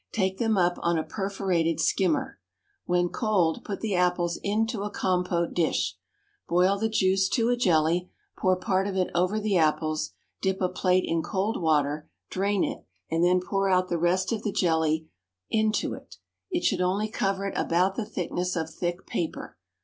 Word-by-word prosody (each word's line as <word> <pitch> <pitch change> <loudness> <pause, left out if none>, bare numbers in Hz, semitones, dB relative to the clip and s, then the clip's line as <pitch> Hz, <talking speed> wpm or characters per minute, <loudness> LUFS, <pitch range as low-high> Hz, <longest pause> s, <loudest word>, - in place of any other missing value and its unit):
Take 190 -2 -1
them 225 -3 +2
up 175 -1 +2
on 170 -1 +1
a 160 - 0
perforated 190 -5 -1
skimmer. 265 +7 +1 0.5
When 175 0 +1
cold, 190 -8 +1
put 200 -2 -5
the 220 -3 -1
apples 180 -1 +1
into 215 +1 0
a 205 - -2
compote 180 -3 0
dish. 170 -2 0 0.5
Boil 185 +3 +3
the 220 +1 0
juice 190 -2 +2
to 230 +1 +1
a 245 - +3
jelly; 175 -4 +2 0.3
pour 185 0 +2
part 190 +1 0
of 195 -1 -3
it 185 - 0
over 180 +5 +1
the 210 -3 +1
apples; 155 -1 +1 0.3
dip 190 -1 0
a 185 - +1
plate 185 0 +2
in 165 0 0
cold 200 +3 -2
water, 150 -2 +1 0.2
drain 200 +1 +1
it, - - -3 0.3
and 165 +1 +2
then 180 +1 +4
pour 195 +1 0
out 185 0 +2
the 170 - 0
rest 185 +4 +1
of 225 - -1
the 210 - -2
jelly 160 -3 +1 0.4
into 220 0 +1
it: - - -11 0.3
it 345 -2 -1
should 190 -4 +2
only 190 +4 +1
cover 195 -2 -1
it - - -4
about 180 +3 +2
the 225 - -3
thickness 180 -2 -3
of 160 -1 -2
thick 175 +1 -3
paper. 165 - -4
185 Hz, 180 wpm, -27 LUFS, 175-200 Hz, 0.5 s, then